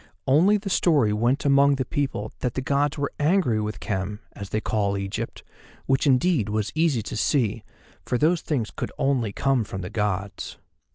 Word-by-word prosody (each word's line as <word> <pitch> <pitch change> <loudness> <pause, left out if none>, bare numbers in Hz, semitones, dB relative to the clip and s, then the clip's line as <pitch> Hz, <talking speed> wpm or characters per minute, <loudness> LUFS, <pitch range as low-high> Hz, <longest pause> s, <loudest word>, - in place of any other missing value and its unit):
Only 170 +10 +5
the 200 0 -8
story 145 -13 +3
went 120 +7 +1
among 140 0 +5
the 130 -1 -2
people 135 -7 -2
that 125 -2 -2
the 130 - -1
Gods 140 +3 0
were 140 -1 -2
angry 150 - +2
with 105 0 -4
Khem 100 0 -3
(as 100 -1 -8
they 110 - 0
call 100 -2 0
Egypt), 100 0 -5 0.4
which 135 +2 +2
indeed 135 - +3
was 105 0 -1
easy 155 -8 +1
to 110 - -6
see, 115 -2 +1 0.4
for 125 - -1
those 160 +5 +2
things 125 -8 -2
could - - -4
come - - -18
only 125 -6 +1
from 115 -5 0
the 90 +2 -6
Gods. 100 -3 -3
125 Hz, 180 wpm, -25 LUFS, 105-145 Hz, 0.4 s, Only